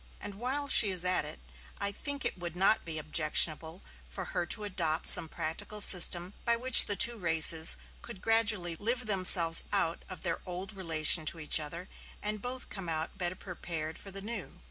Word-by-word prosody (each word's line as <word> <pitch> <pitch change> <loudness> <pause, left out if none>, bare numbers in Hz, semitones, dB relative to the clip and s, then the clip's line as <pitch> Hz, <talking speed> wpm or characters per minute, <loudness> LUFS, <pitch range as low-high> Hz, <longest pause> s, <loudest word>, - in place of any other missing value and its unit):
And 205 - -10
while 260 +7 -6
she 220 -6 +5
is 185 -1 -3
at 180 0 +2
it, - - -11 0.4
I 200 - -2
think 285 +6 -6
it - - -3
would 175 -1 -9
not 195 +4 -1
be 160 -2 -7
objectionable 155 +2 -2 0.2
for - - -9
her 175 - -4
to 215 - -3
adopt 170 -6 -4
some 160 - +7
practical 205 +9 -7
system 180 -1 +4
by 235 - 0
which 250 +1 +7
the 205 - -2
two 235 +2 +4
races 160 -2 +4 0.2
could 235 -5 -10
gradually 210 -6 -1
live 235 +7 -3
themselves 185 -5 +4
out 165 +1 -3
of 185 - -11
their 170 -3 -5
old 185 +3 -10
relation 165 -3 +1
to 165 - -3
each 155 0 +1
other, 165 +4 -10 0.3
and 210 0 -5
both 250 +2 -8
come 195 -4 -9
out 160 0 -6
better 175 0 -4
prepared 165 -4 -10
for 200 - -10
the 195 0 -8
new. 210 -9 -9
185 Hz, 190 wpm, -27 LUFS, 165-210 Hz, 0.4 s, some